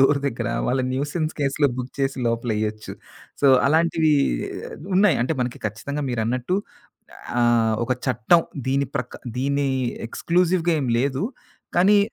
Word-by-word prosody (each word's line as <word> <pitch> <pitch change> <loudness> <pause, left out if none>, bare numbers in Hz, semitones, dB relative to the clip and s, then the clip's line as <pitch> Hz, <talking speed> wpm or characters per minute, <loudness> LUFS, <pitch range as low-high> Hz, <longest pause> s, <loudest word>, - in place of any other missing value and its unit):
Door 140 +1 +4
దగ్గర. 125 -4 -2 0.2
వాళ్ళు 130 +1 +1
nuisance 150 +4 -2
కేస్‌లో 140 +1 +2
book 125 +1 -5
చేసి 135 -1 -1
లోపలేయొచ్చు. 110 -2 -2 0.5
సో 140 - +5 0.2
అలాంటివి 160 +1 +3 0.8
ఉన్నాయి. 195 -2 +5
అంటే 155 +6 0
మనకి 125 0 -4
ఖచ్చితంగా 140 +8 -4
మీరన్నట్టు 125 - -1 0.8
ఆహ్, 115 -2 +3
ఒక 130 - 0
చట్టం 130 +7 +3 0.3
దీని 140 +1 +1
ప్రక్ 125 0 -4 0.2
దీని 140 +1 +1 0.4
ఎక్స్‌క్లూసివ్‌గా 175 +2 +1
ఏమి 125 -4 0
లేదు. 135 +6 0 0.5
కానీ 200 +4 +6
135 Hz, 125 wpm, -23 LUFS, 120-160 Hz, 0.8 s, కానీ